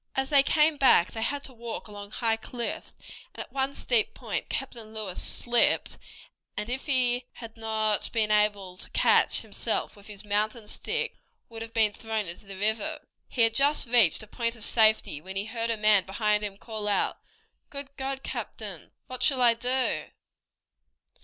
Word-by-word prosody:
As 270 +1 -1
they 285 -2 +7
came 300 +2 +2
back 260 -10 +5
they 225 - -6
had 280 +5 -2
to 265 - -4
walk 235 -1 -7
along 205 -1 -9
high 225 +1 0
cliffs, 235 +1 -6 0.4
and - - -5
at - - -23
one 270 0 0
steep 240 -5 0
point - - -5
Captain 230 -5 -5
Lewis 205 -4 -3
slipped, 240 -1 +2 0.6
and, 215 +3 -3
if 265 +4 -3
he 250 -2 +2
had 225 -2 -10
not 220 -2 -1
been 220 -2 +1
able 205 -3 +1
to - - -7
catch - - +5
himself - - -3
with 205 -1 -15
his 210 -1 -9
mountain 210 +2 -1
stick, - - -2 0.3
would 225 -1 -9
have 225 0 -8
been 220 -2 +3
thrown 220 -1 -3
into 170 +4 -10
the 195 -1 -9
river. 220 +10 -1 0.3
He 240 - +2
had 225 0 +3
just 280 +1 +2
reached 230 -5 +4
a - - -13
point 230 +2 -2
of 220 - -7
safety 220 -9 +4
when 190 +3 -9
he 195 +1 -1
heard 230 +1 -3
a 230 - 0
man 210 -2 +4
behind 210 +1 0
him 200 -1 -4
call 215 -1 -5
out, 205 - 0 0.5
"Good 280 -1 -8
God, 270 0 -4
captain, - - -7
what 255 -1 -8
shall 270 -3 +3
I 240 -2 +6
do?" 250 +2 +1
225 Hz, 180 wpm, -27 LUFS, 210-250 Hz, 0.6 s, they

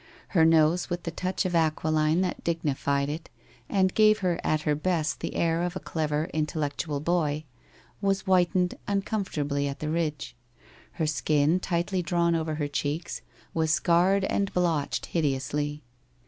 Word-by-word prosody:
Her 165 -5 +4
nose, 160 +2 +4
with 175 -1 -3
the 170 - -3
touch 185 +4 -2
of 180 - -1
aquiline 155 0 +2
that 185 -1 -2
dignified 140 -4 0
it 155 +3 -5 0.4
and 190 -2 +2
gave 215 -1 +5
her 175 -2 +1
at 155 -1 +1
her 150 -1 +1
best 155 0 -1
the - - -4
air 165 0 +1
of 175 0 -2
a - - -2
clever 155 0 -2
intellectual 150 -1 -2
boy, 155 -2 0 0.6
was 195 -1 +1
whitened 180 -1 +2
uncomfortably 155 -9 -1
on 140 - -4
the - - -5
Tidge. 155 -2 -2 0.6
Her 160 - -1
skin, 150 +3 +2
tightly 180 +1 -1
drawn 170 -1 +1
over 160 -1 -1
her 150 -1 -1
cheeks, 145 +4 -3 0.3
was 160 -1 +1
scarred 175 +5 +3
and 200 0 0
blotched 170 -5 0
hide 165 - +1
ously. 145 +2 -2
165 Hz, 155 wpm, -27 LUFS, 150-180 Hz, 0.6 s, gave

